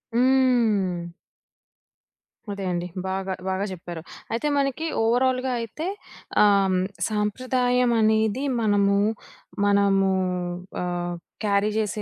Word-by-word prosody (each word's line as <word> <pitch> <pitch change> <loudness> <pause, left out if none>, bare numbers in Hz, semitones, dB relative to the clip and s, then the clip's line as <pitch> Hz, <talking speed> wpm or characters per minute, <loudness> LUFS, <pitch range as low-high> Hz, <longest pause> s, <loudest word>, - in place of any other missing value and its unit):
హ్మ్. 235 -9 +2 1.4
అదే 200 -1 -5
అండి. 175 0 -2 0.2
బాగా 190 0 -2 0.2
బాగా 190 +1 -1
చెప్పారు. 170 -2 -7 0.3
అయితే 235 +6 -1
మనకి 280 +3 0 0.2
ఓవరాల్‌గా 255 +2 +2
అయితే 265 - -5 0.6
ఆహ్, 195 -2 +4 0.3
సంప్రదాయం 250 +3 +1
అనేది 220 +3 +2 0.2
మనము, 200 -2 +3 0.7
మనము 200 -1 +3 0.7
ఆహ్, 175 0 -2 0.3
క్యారీ 200 +1 +2
చేసే 215 0 -2
210 Hz, 90 wpm, -24 LUFS, 195-250 Hz, 1.4 s, ఆహ్